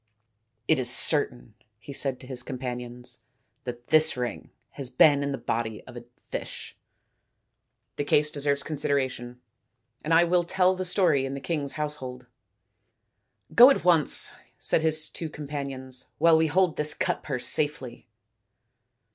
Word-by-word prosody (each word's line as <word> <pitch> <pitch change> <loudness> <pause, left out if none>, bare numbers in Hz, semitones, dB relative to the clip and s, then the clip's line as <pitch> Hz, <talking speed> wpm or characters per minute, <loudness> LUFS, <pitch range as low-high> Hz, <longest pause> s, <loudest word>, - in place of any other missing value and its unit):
" 110 +1 -50
It - - +3
is 125 -2 +3
certain," 130 -4 +2 0.2
he 125 +6 -10
said 135 -2 -1
to - - -9
his 125 -1 -4
companions, 125 -1 -3 0.2
" 125 +4 -45
that 120 -1 -8
this 155 -3 +3
ring 125 -1 -4 0.2
has 135 -3 -4
been 145 +3 +5
in 140 0 -2
the 135 - -3
body 110 -3 -3
of 125 - -13
a 120 0 -9 0.3
fish. - - -7 1.2
The - - -1
case 150 +1 +2
deserves 145 -1 0
consideration, 130 -5 -2 0.6
and 155 - -3
I 165 +1 +6
will 175 +1 +2
tell 185 +1 +2
the 185 0 -3
story 180 -7 +2
in 135 0 -4
the - - -5
king's 145 -3 -3
household." 130 -5 -5 0.7
" - - -30
Go 245 +3 +9
at 275 - +1
once," 170 -4 +3 0.3
said - - +1
his 155 -1 0
two 165 - -6
companions, 140 -4 -6
" - - -48
while 165 +1 +5
we 160 0 +3
hold 180 +1 +1
this 150 0 0
cut - - -1
purse 130 -4 -3
safely." 135 -3 -3
140 Hz, 160 wpm, -26 LUFS, 125-155 Hz, 1.2 s, Go